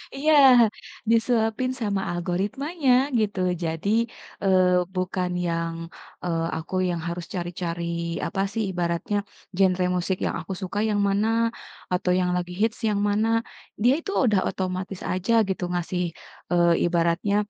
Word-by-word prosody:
Iya, 305 +3 +2 0.8
disuapin 230 +1 +2
sama 200 -3 0
algoritmanya, 250 - -1 0.3
gitu. 205 -3 -1 0.2
Jadi, 165 +4 -2 0.5
eee, 185 -2 +4
bukan 185 0 -1 0.2
yang, 165 -1 -1 0.5
eee, 165 -2 -1
aku 160 +3 -6
yang 170 -2 -2
harus 170 0 -4
cari-cari, 170 -1 -3
apa 195 - -2
sih, 225 - -1
ibaratnya, 175 +3 -1 0.4
"Genre 185 -1 +3
musik 180 +1 -1
yang - - -1
aku 195 - -5
suka 190 +2 -3
yang 205 -1 +1
mana? 200 +2 +1 0.7
Atau, 180 0 +1
yang 180 -1 +1
lagi 180 0 -4
hits 225 0 +1
yang 205 -1 0
mana?" 225 +2 +2 0.4
Dia 245 +2 +6
itu, 365 - -5
udah 205 -5 +2
otomatis 185 0 -4
aja, 185 +5 0 0.2
gitu, 190 -1 -2
ngasih, 180 +1 -1 0.5
eee, 170 -1 +4
ibaratnya 170 +3 +1
185 Hz, 135 wpm, -25 LUFS, 175-210 Hz, 0.8 s, Dia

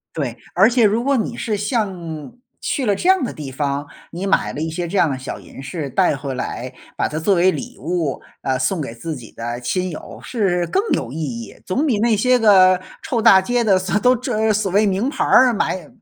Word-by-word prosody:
对， 130 -7 -3 0.2
而 195 +4 +6
且 240 -1 +3
如 215 +3 +2
果 280 0 +2
你 235 0 -2
是 220 -3 -2
像 195 - -3 0.3
去 265 - -2
了 205 -2 +2
这 350 - -1
样 380 -3 +5
的 255 - -2
地 145 -3 -7
方， 140 +1 -2 0.2
你 180 +3 -5
买 195 - +1
了 - - -6
一 160 +1 -2
些 170 +2 -3
这 195 - -3
样 165 - +4
的 135 - -2
小 130 - -6
银 - - -12
饰 145 +2 -5
带 180 -3 +2
回 135 0 -5
来， 125 0 -5 0.2
把 - - +1
它 155 - -4
作 175 +5 +2
为 180 +2 +4
礼 245 +6 -6
物， 165 -6 -2 0.2
呃， 130 -1 0
送 160 +8 0
给 135 -6 -4
自 160 +7 -5
己 120 -6 -10
的 120 +1 -5
亲 180 +10 -1
友， 155 - -9
是 185 -7 0
更 390 - +1
有 115 - -1
意 - - -7
义。 120 -7 -5
总 265 +12 0
比 240 -8 +1
那 225 0 +3
些 250 +4 +3
个 185 -5 +6 0.2
臭 235 -3 -1
大 190 -2 +7
街 245 +5 0
的 200 -4 +4
所 185 +2 -2
都 250 +4 +4
这 220 -3 0
所 205 -3 -1
谓 210 +2 +4
名 200 +5 0
牌 285 - -1
儿 255 -1 +6
买 185 -6 -2
185 Hz, 245 characters per minute, -20 LUFS, 150-220 Hz, 0.3 s, 大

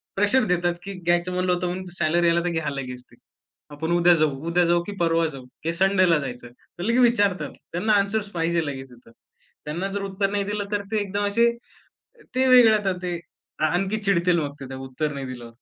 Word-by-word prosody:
Pressure 205 +6 +3
देतात 175 -1 +1
की 200 - -6
घ्यायचं 175 0 0
म्हणलं 180 0 +1
होतं 180 0 -1
म्हणून 185 +1 -4
सॅलरी 170 +1 +2
आला 170 0 +3
तर - - +1
घ्या 160 -3 -2
लगेच 125 -3 -6
ते. - - -18 0.6
आपण 160 +3 -4
उद्या 175 0 +5
जाऊ, 155 -1 +3 0.2
उद्या 175 +1 +3
जाऊ 170 0 +3
की 205 - -7
परवा 165 -1 +2
जाऊ? 135 -4 -9 0.2
किंवा 165 +1 -1
संडेला 185 -3 +4
जायचं? 125 -3 -6 0.3
तर - - -3
लगेच 230 +5 +2
विचारतात. 205 -9 +2 0.2
त्यांना 210 +6 +1
ॲन्सर्स 205 +1 0
पाहिजे 170 -1 0
लगेच 135 -2 -6
तिथं. 120 -1 -18 0.5
त्यांना 170 +6 -3
जर 200 0 -3
उत्तर 195 0 -1
नाही 205 -1 0
दिलं 205 0 -3
तर 205 -1 0
ते 220 - +1
एकदम 205 +1 -2
असे 235 +3 +3 0.8
ते 260 +1 +2
वेगळं 245 -3 +7
आता 200 -2 0
ते 175 -1 -2 0.5
आणखी 195 +4 0
चिडतील 180 -3 +2
मग 145 -3 -3
ते 135 - -7
त्या 130 - -7
उत्तर 150 +3 -2
नाही 135 -1 -5
दिल्यावर. 120 -2 -8
175 Hz, 205 wpm, -24 LUFS, 155-200 Hz, 0.8 s, वेगळं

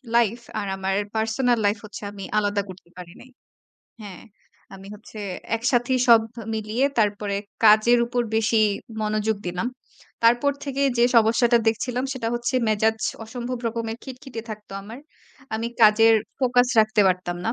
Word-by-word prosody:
Life 235 0 +2 0.2
আর 205 - -4
আমার 190 0 -1 0.2
personal 230 +2 +1
life 205 +2 +2
হচ্ছে 210 - -10
আমি 200 -1 -9
আলাদা 205 -1 +1
করতে 180 -2 -12
পারি 175 -1 -10
নাই। 255 - -15 0.7
হ্যাঁ, 200 -4 -10 0.5
আমি 195 0 -11
হচ্ছে 215 0 -12 0.4
একসাথেই 245 +2 +1
সব 230 -2 +8
ভ - - -43 0.2
মিলিয়ে 220 +5 -1
তারপরে 205 -1 0 0.3
কাজের 220 +3 +6
উপর 245 +1 -1
বেশি 225 +1 +2 0.4
মনোযোগ 215 0 -1
দিলাম। 180 +6 -2 0.6
তারপর 240 +5 +4
থেকে 275 0 -3 0.2
যে 235 - +4
সমস্যাটা 235 +1 +4
দেখছিলাম, 245 +3 -1
সেটা 245 -4 -4
হচ্ছে 240 +2 -2
মেজাজ 220 +1 +1 0.3
অসম্ভব 245 +2 -5
রকমের 225 0 -4
খিটখিটে 255 -3 -8
থাকতো 210 -1 -9
আমার। 225 +6 -10 0.6
আমি 230 +1 -2
কাজের 225 +1 +6 0.3
ফোকাস 245 -1 +3
রাখতে 215 0 +3
পারতাম 180 -1 -1
না। 225 - +1
225 Hz, 145 wpm, -23 LUFS, 210-240 Hz, 0.7 s, সব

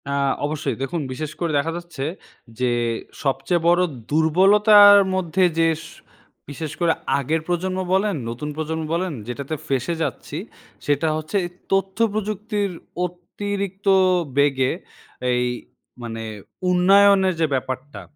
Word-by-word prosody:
অ্যা 140 0 -1 0.3
অবশ্যই 155 +2 -2
দেখুন, 160 +5 -2
বিশেষ 150 +3 -5
করে 170 -2 -1
দেখা 150 +3 0
যাচ্ছে 170 -6 -6 0.5
যে, 125 -1 +1 0.5
সবচেয়ে 160 +5 0
বড়ো 175 +1 +5 0.3
দুর্বলতার 205 +6 +7 0.2
মধ্যে 185 0 0 0.2
যে 165 - +4 0.2
স - - -10 0.6
বিশেষ 150 +1 -5
করে 170 -2 +3 0.3
আগের 155 +4 -1
প্রজন্ম 185 +1 -1
বলেন, 200 +2 +2 0.2
নতুন 125 +6 -5
প্রজন্ম 160 +1 -3
বলেন 180 +2 -1 0.2
যেটাতে 140 +5 -4
ফেঁসে 135 +5 -1
যাচ্ছি, - - -5 0.5
সেটা 145 +2 +1
হচ্ছে 155 +3 -5
এই - - -5 0.2
তথ্য 195 0 0 0.2
প্রযুক্তির 210 -1 -2 0.3
অতিরিক্ত 195 +2 -5 0.5
বেগে 135 -2 +3 0.6
এই 125 0 +1 0.6
মানে 115 -1 -5 0.5
উন্নয়নের 190 +1 +5
যে 165 - +3
ব্যাপারটা। 130 +2 -4
170 Hz, 120 wpm, -22 LUFS, 145-190 Hz, 0.6 s, দুর্বলতার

